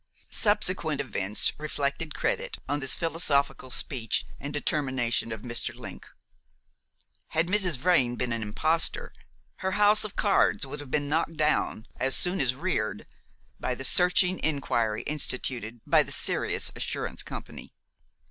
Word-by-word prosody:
Subsequent 185 -8 +1
events 105 -6 +1
reflected 150 0 -3
credit - - -2
on 145 +1 -1
this 135 -2 +4
philosophical 145 -5 0
speech 120 -3 -1
and 140 - -5
determination 130 -6 -1
of 110 -1 -6
Mr. 120 -1 0
Link. - - -10 1.2
Had 160 +2 0
Mrs. 180 -5 +1
Vrain 130 -5 +2
been 125 -1 -2
an 115 - -2
imposter, 160 - +1 0.4
her 190 -1 -3
house 210 +1 +5
of 210 -1 -2
cards 200 -7 +2
would 140 +2 -8
have 145 -2 -9
been 145 +2 0
knocked 160 +2 -1
down, 150 -7 0
as 130 +1 +3
soon 180 +2 +2
as 130 -1 +1
reared, 110 - -3 0.5
by 125 - -2
the 135 - -2
searching 180 +3 +4
inquiry 120 -8 -1
instituted 125 -6 -2
by - - +4
the - - -5
Sirius - - +2
Assurance - - -2
Company. - - -9
145 Hz, 140 wpm, -27 LUFS, 125-170 Hz, 1.2 s, house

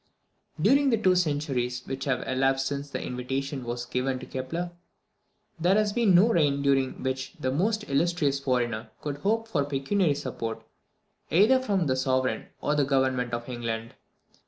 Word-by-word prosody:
During 280 0 +4
the 230 - +3
two 185 -4 +3
centuries 140 -7 -1
which 135 0 -4
have 130 -3 -1
elapsed 135 +1 +1
since 140 +1 -3
this - - -4
invitation 135 +2 -3
was 120 0 -4
given 130 +1 -1
to 130 - -8
Kepler, 165 +7 -4 0.9
there 180 +4 +3
has 210 -1 +2
been 220 -6 +4
no 195 +7 +6
reign 145 -8 +2
during 135 -2 +1
which 130 0 -3
the 130 - -1
most 215 +9 0
illustrious 145 -1 +1
foreigner 120 -4 -1
could 145 -1 -4
hope 225 +8 0
for 160 -10 0
pecuniary 145 +4 +1
support, 115 -4 -5 0.7
either 215 +10 +5
from 200 -8 0
the 130 -3 +1
Sovereign 130 0 0
or 150 - +1
the 150 -1 +2
Government 130 -3 +1
of 120 0 -4
England. 115 -2 -4
140 Hz, 160 wpm, -27 LUFS, 130-175 Hz, 0.9 s, no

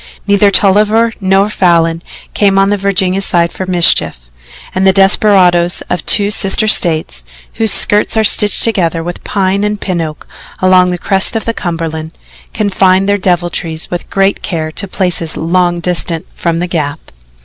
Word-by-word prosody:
Neither 200 0 +3
Tolliver 210 +4 +2
nor 195 +1 +2
Falin 165 -3 +1 0.3
came 195 -2 +1
on 195 +1 +2
the - - +2
Virginia 195 -1 -1
side 170 -3 +1
for 185 - -6
mischief, 165 - +1 0.4
and 190 +1 +1
the - - +6
desperadoes 185 -3 +2
of 175 - -2
two 205 0 +3
sister 200 +2 0
States, 160 - 0 0.3
whose 220 -2 +1
skirts 210 +2 +2
are 220 - +2
stitched 210 0 +2
together 170 -7 -1
with 175 +1 -7
pine 195 0 -1
and 210 0 -2
pin 180 -4 -3
oak 155 -2 -7 0.3
along 185 -1 +3
the 180 - -3
crest 190 +4 -1
of 225 - -3
the 230 - -2
Cumberland, 165 -4 -5 0.4
confined 195 -2 +1
their 205 0 +1
deviltries 175 -3 -2
with 175 - -5
great 195 0 0
care 160 -4 -4
to 200 - -4
places 180 -4 -1
long 175 +1 0
distant 170 -2 -3
from 170 -1 -2
the 175 +2 -2
Gap. 155 -3 -4
185 Hz, 160 wpm, -11 LUFS, 170-200 Hz, 0.4 s, the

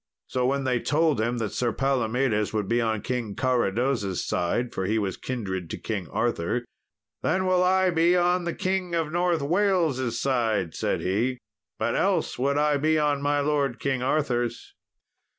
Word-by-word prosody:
So 125 -1 0
when 140 +1 0
they 125 -2 +1
told 150 -2 +1
him 120 +2 0
that 110 -3 -2
Sir 120 -2 0
Palomedes 125 -5 0
would 105 -3 -1
be 120 +2 +2
on 110 -3 -1
King 120 -5 -3
Carados' 120 -5 0
side 120 +8 -1
for 95 - -2
he 110 +2 +1
was 100 -3 -1
kindred 95 -9 -4
to - - -4
King 100 -6 -4
Arthur 120 - -1 0.6
"Then 185 0 +1
will 185 -1 +3
I 185 0 +3
be 170 +2 +3
on 180 0 +2
the 170 - -2
King 185 -2 -1
of 160 -2 -1
North 175 -2 +1
Wales' 160 - +1
side," 110 -10 0
said - - -1
he, 115 +8 0 0.4
"but 115 +1 -1
else 195 -9 0
would 140 +2 +1
I 150 0 +3
be 155 +2 +2
on 145 -2 +1
my 145 0 +1
lord 140 -4 0
King 135 -3 -1
Arthur's." 125 -3 -1
130 Hz, 170 wpm, -26 LUFS, 115-155 Hz, 0.6 s, will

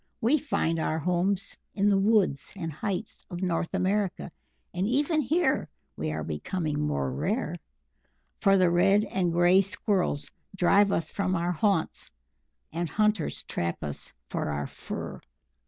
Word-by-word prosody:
"We 270 +7 +3
find 165 - 0
our 155 0 0
homes 180 +4 0 0.2
in 200 0 +2
the 200 -1 +4
woods 195 -9 +2
and 165 -4 -4
heights 200 +7 -4
of 175 -1 -5
North 170 -2 -1
America, 190 -1 0 0.4
and 185 +3 0
even 295 +6 +2
here 295 +1 +1 0.3
we 75 0 -3
are 80 0 -3
becoming 150 - -2
more 70 -3 -1
rare, 185 - -1 0.9
for 195 -2 +5
the 180 -2 +4
Red 195 +4 +4
and 185 -4 0
Grey 175 +3 +5
Squirrels 190 -6 -1 0.2
drive 195 +2 +4
us 165 -4 -1
from 190 -2 0
our 170 +1 0
haunts, 180 -1 0 0.6
and 170 0 -2
hunters 210 -5 0
trap 85 0 -3
us 75 -1 -5 0.2
for - - -2
our 70 -1 -2
fur." - - -7
185 Hz, 145 wpm, -28 LUFS, 160-200 Hz, 0.9 s, for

